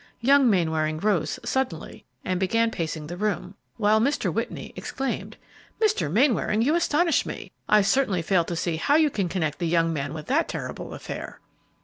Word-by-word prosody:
Young 270 Hz, +1 st, +5 dB
Mainwaring 160 Hz, -5 st, +1 dB
rose 170 Hz, -6 st, 0 dB
suddenly 255 Hz, -12 st, -3 dB, 0.2 s
and 185 Hz, -1 st, -1 dB
began 230 Hz, +5 st, +2 dB
pacing 160 Hz, -5 st, -4 dB
the 175 Hz, +3 st, -6 dB
room, 200 Hz, -2 st, -2 dB, 0.2 s
while 215 Hz, 0 st, +3 dB
Mr. 280 Hz, +6 st, 0 dB
Whitney -, -, -4 dB
exclaimed, 270 Hz, 0 st, -4 dB, 0.4 s
"Mr. 290 Hz, -, +1 dB
Mainwaring, 225 Hz, -, +2 dB
you 290 Hz, +6 st, +2 dB
astonish 335 Hz, -1 st, +2 dB
me! -, -, -7 dB, 0.2 s
I 210 Hz, -1 st, +6 dB
certainly 200 Hz, -5 st, +1 dB
fail 180 Hz, 0 st, +2 dB
to 170 Hz, -, -4 dB
see 165 Hz, -1 st, -1 dB
how 280 Hz, -, +2 dB
you 310 Hz, -2 st, +4 dB
can 195 Hz, -7 st, -1 dB
connect 160 Hz, -4 st, -2 dB
the 170 Hz, -, -1 dB
young 165 Hz, 0 st, +2 dB
man 145 Hz, 0 st, -3 dB
with 155 Hz, -, -7 dB
that 290 Hz, +7 st, +1 dB
terrible -, -, -5 dB
affair." -, -, -7 dB
195 Hz, 170 wpm, -25 LUFS, 165-260 Hz, 0.4 s, I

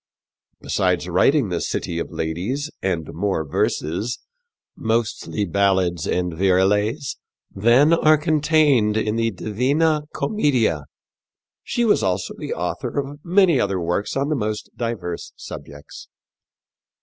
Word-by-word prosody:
Besides -, -, 0 dB
writing 135 Hz, -7 st, +3 dB
The 85 Hz, -2 st, -2 dB
City 85 Hz, -1 st, -2 dB
of -, -, -4 dB
Ladies 90 Hz, -, -3 dB
and 85 Hz, -5 st, -2 dB
more 90 Hz, -4 st, -1 dB
verses 85 Hz, +11 st, -1 dB, 0.6 s
mostly 110 Hz, -2 st, -1 dB
ballads 95 Hz, -2 st, +1 dB
and 90 Hz, -1 st, -1 dB
virelays 105 Hz, -, +1 dB, 0.4 s
than 120 Hz, +10 st, +4 dB
are 155 Hz, -2 st, +5 dB
contained 150 Hz, -7 st, +3 dB
in 110 Hz, 0 st, 0 dB
the 115 Hz, 0 st, +1 dB
Divina 140 Hz, -, 0 dB
Commedia, 125 Hz, -, 0 dB, 0.8 s
she 240 Hz, -, 0 dB
was 215 Hz, -, +3 dB
also 95 Hz, 0 st, -1 dB
the -, -, -6 dB
author -, -, -3 dB
of 140 Hz, +1 st, -5 dB
many 175 Hz, -5 st, +4 dB
other 100 Hz, -2 st, 0 dB
works 90 Hz, +8 st, -1 dB
on 140 Hz, +2 st, 0 dB
the 155 Hz, -, +1 dB
most 105 Hz, -4 st, -3 dB
diverse 105 Hz, -8 st, -4 dB
subjects. 70 Hz, 0 st, -10 dB
110 Hz, 120 wpm, -22 LUFS, 90-145 Hz, 0.8 s, are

